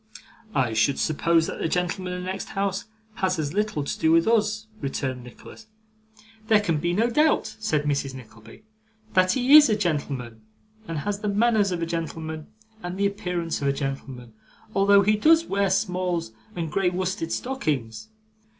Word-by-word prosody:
'I 125 -4 +1
should 110 +5 +2
suppose 165 +1 +2
that - - -6
the - - 0
gentleman 180 +2 -2
in 180 - -4
the - - -6
next 190 +1 -4
house 195 -1 -1 0.3
has 185 -1 0
as 150 -1 -2
little 210 -7 -1
to - - -4
do 160 - +3
with 165 +3 +4
us,' 215 -1 +1
returned 130 -2 -3
Nicholas. 125 - -13 0.8
'There 215 -1 +5
can 165 -7 0
be 170 +3 0
no 215 +6 +2
doubt,' 240 -4 +2
said 155 -9 0
Mrs. 140 -2 -1
Nickleby, 115 - -14 0.5
'that 185 0 +4
he 260 +3 +5
IS 300 -4 +9
a 215 - +3
gentleman, 140 - -3 0.5
and 165 - -4
has 200 +7 -2
the 210 -1 -2
manners 210 -1 +2
of 170 -2 -2
a - - +1
gentleman, 160 -2 -5 0.3
and 175 +1 -5
the 200 - +1
appearance 180 -5 -2
of 140 - 0
a 140 - +2
gentleman, 135 -4 -5 0.4
although 200 0 +5
he 210 +2 +3
does 320 +9 +4
wear 200 -4 0
smalls 180 - -1 0.2
and 165 -3 -3
grey 190 +2 +2
worsted 180 -2 -3
stockings. 155 - -3
180 Hz, 175 wpm, -25 LUFS, 150-205 Hz, 0.8 s, IS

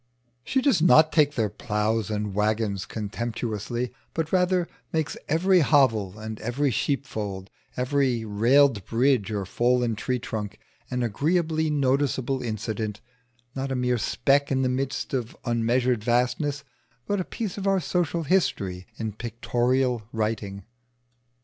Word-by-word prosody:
She 265 -1 0
does 270 - +3
not 155 -2 +6
take 150 -2 +3
their 110 -4 +1
ploughs 105 +1 -1
and 105 -2 -2
waggons 105 -2 0
contemptuously, 115 +2 -3 0.2
but 160 -1 -2
rather 180 -1 +2 0.2
makes 160 -2 -1
every 180 +4 +4
hovel 115 - +3
and 110 0 -6
every 130 +5 0
sheepfold, 105 -8 -2 0.3
every 125 -2 +1
railed 115 +2 +4
bridge 120 -3 +2
or 100 -3 -2
fallen 120 +2 +1
tree 125 +4 -1
trunk 110 -3 -5 0.3
an 125 -1 -1
agreeably 160 - +1
noticeable 135 -2 +1
incident; 110 -2 -3 0.5
not 135 0 -3
a - - 0
mere 125 -1 +1
speck 140 +5 +2
in 130 0 +2
the 130 - +2
midst 135 +2 -2
of 125 -3 -3
unmeasured 120 0 +1
vastness, 125 +5 0 0.4
but 205 -1 0
a - - -1
piece 205 0 -5
of 200 - -2
our 195 -1 +3
social 170 -1 -1
history 100 - 0
in 110 -1 -3
pictorial 120 +2 0
writing. 105 -3 -2
125 Hz, 135 wpm, -26 LUFS, 110-145 Hz, 0.5 s, not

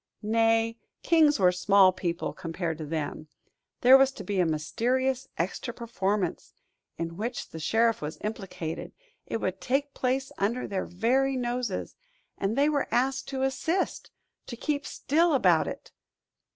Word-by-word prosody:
Nay, 225 +1 +2 0.2
kings 315 -3 +4
were 185 -3 +5
small 190 +1 +5
people 175 -1 -3
compared 165 -2 -4
to 155 - -5
them. 155 0 -4 0.5
There 260 +2 +8
was 270 0 +4
to - - -8
be 200 -2 -2
a 175 - +3
mysterious 250 - 0
extra 190 +7 -3
performance, 205 -5 -2 0.4
in 165 0 -4
which 235 +4 -4
the 160 - -8
sheriff 225 +7 +2
was 150 +2 -5
implicated; 195 -6 -5 0.3
it - - -2
would 190 -3 -3
take 280 +2 0
place 265 +1 -1
under 225 +6 0
their 190 -2 -2
very 260 +9 +1
noses, 245 -4 -3 0.4
and 200 +5 -2
they 285 +1 +4
were 295 -2 +1
asked 265 +2 0
to 265 -1 -2
assist, 320 +7 -1 0.4
to 240 - -6
keep 290 +2 -2
still 325 +2 +2
about 265 - +4
it! - - -7
230 Hz, 150 wpm, -28 LUFS, 185-265 Hz, 0.5 s, There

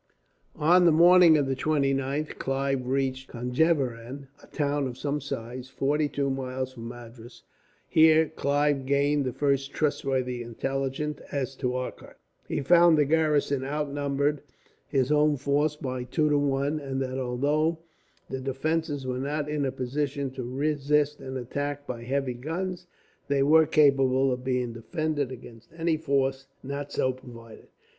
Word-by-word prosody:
On 175 +4 +4
the 170 - +6
morning 170 0 +7
of 145 - +1
the 135 0 -1
29th 140 0 -1
Clive 135 -1 -1
reached 130 0 -1
Conjeveram, 130 0 -1
a - - -17
town 145 -1 -1
of 125 -1 -7
some 145 +2 -2
size, 130 -1 -6
forty 145 +3 0
two 140 -1 -1
miles 130 -1 -4
from 115 -2 -8
Madras. 120 0 -11 0.4
Here 160 0 +5
Clive 145 -2 0
gained 140 +1 +2
the 130 - -1
first 140 +1 0
trustworthy 135 -4 -1
intelligence 135 +5 -3
as 135 -2 -3
to 125 -2 -1
Arcot. 130 0 -6 0.3
He - - -2
found 170 +2 +6
the 150 - +4
garrison 150 -3 +1
outnumbered 145 0 -1 0.5
his 135 -1 0
own 150 0 +3
force 145 +3 +1
by 130 -4 -4
two 150 +4 +1
to 145 - +4
one; 140 +2 0
and 135 -2 -4
that, 130 0 -4
although 145 +6 0 0.5
the 130 0 -5
defences 145 +2 -2
were 125 0 -2
not 145 +2 -2
in 150 -1 -1
a 135 - -1
position 140 +2 -3
to 130 0 -6
resist 145 +3 0
an 130 0 -6
attack 145 +3 -4
by 120 -3 -6
heavy 130 +1 -1
guns, 175 +8 -4 0.4
they 140 -1 +2
were 155 +2 +5
capable 135 -2 +4
of 125 0 -3
being 125 -2 -1
defended 145 +3 -2
against 120 -2 -11
any 165 -1 +1
force 135 -3 -1 0.2
not 140 +1 -5
so 130 - 0
provided. 115 -3 -13
140 Hz, 150 wpm, -27 LUFS, 130-150 Hz, 0.5 s, morning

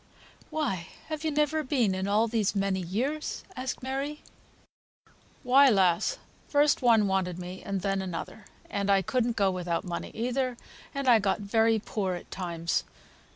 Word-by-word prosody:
"Why 195 - -2 0.2
have 310 -1 -4
you 315 - +1
never 300 +1 +1
been 255 -8 +1
in 190 +1 -2
all 215 +3 +3
these 215 -3 0
many 195 -1 +1
years?" 245 - -2
asked 255 0 -4
Mary. 275 +3 -3 1.2
"Why, 270 +2 +6
lass! 195 - +3 0.3
first 290 0 +3
one 225 -4 +5
wanted 190 -2 0
me 180 +1 -7
and 195 -1 -3
then 195 0 0
another; 190 +3 -6 0.2
and 200 0 -2
I 195 -1 +4
couldn't 240 +3 0
go 195 -2 +3
without 175 -2 -2
money 175 -1 -4
either, 250 +2 -1 0.4
and 275 -1 -2
I 235 -3 +7
got 205 +1 0
very 225 +2 +3
poor 200 -3 -2
at 175 - -10
times. 170 -3 -2
210 Hz, 155 wpm, -28 LUFS, 190-260 Hz, 1.2 s, I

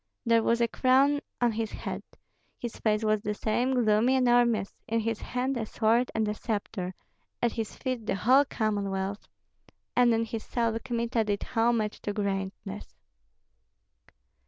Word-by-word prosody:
There 230 -1 +4
was 235 +1 +2
a 235 - +4
crown 270 +4 +3 0.2
on 240 -1 +4
his 220 0 -3
head; - - -5 0.6
his 240 -2 -6
face 215 0 +1
was 215 -1 +2
the 210 0 -2
same, 245 +4 +1
gloomy, 220 +4 +3
enormous; 240 -5 +3
in 230 0 +1
his 225 0 -2
hand 255 +2 -2
a 225 - -2
sword 230 +3 +2
and 220 -1 +1
a 210 - 0
sceptre, 205 -4 -4 0.4
at 235 - +1
his 225 -2 -4
feet 255 -4 -4
the - - +1
whole 255 +9 +5
Commonwealth. 200 -4 -2 0.7
And 245 -1 +5
in 230 0 +2
his 225 -1 -5
soul 230 -2 -1
Kmita 235 -2 0
did 205 -1 -1
homage 225 -2 0
to 205 - -3
greatness. 195 0 -4
225 Hz, 155 wpm, -28 LUFS, 210-240 Hz, 0.7 s, whole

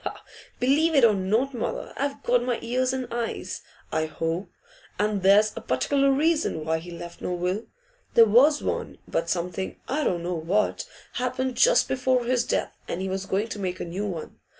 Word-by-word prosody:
'Believe 305 +6 +3
it 275 - +5
or 220 - +5
not, 215 +8 0
mother; 235 - -4
I've 280 0 -3
got 245 0 +3
my 245 -1 0
ears 255 +2 +1
and 260 -1 -3
eyes, 235 -1 -3 0.3
I 160 0 0
hope. 165 +4 -3 0.5
And 210 -1 0
there's 205 +3 +5
a - - -5
particular 275 - +1
reason 295 - +1
why 160 0 +1
he 175 +2 -10
left 170 0 -9
no 180 - -2
will. 180 +5 -2 0.5
There 230 - +9
was 265 +8 +5
one, - - -3
but 165 - -1
something 180 +2 -3
I 300 +3 0
don't 175 -8 0
know 180 +1 -2
what 175 +6 0 0.3
happened 255 0 -1
just - - +5
before 255 -1 +1
his 245 0 +2
death, - - -1
and 170 - -3
he 190 0 -2
was 190 +1 -3
going 205 +4 0
to 210 - -5
make 185 -2 -3
a - - -3
new 190 +5 -3
one. 170 -5 -6
215 Hz, 190 wpm, -26 LUFS, 180-255 Hz, 0.5 s, There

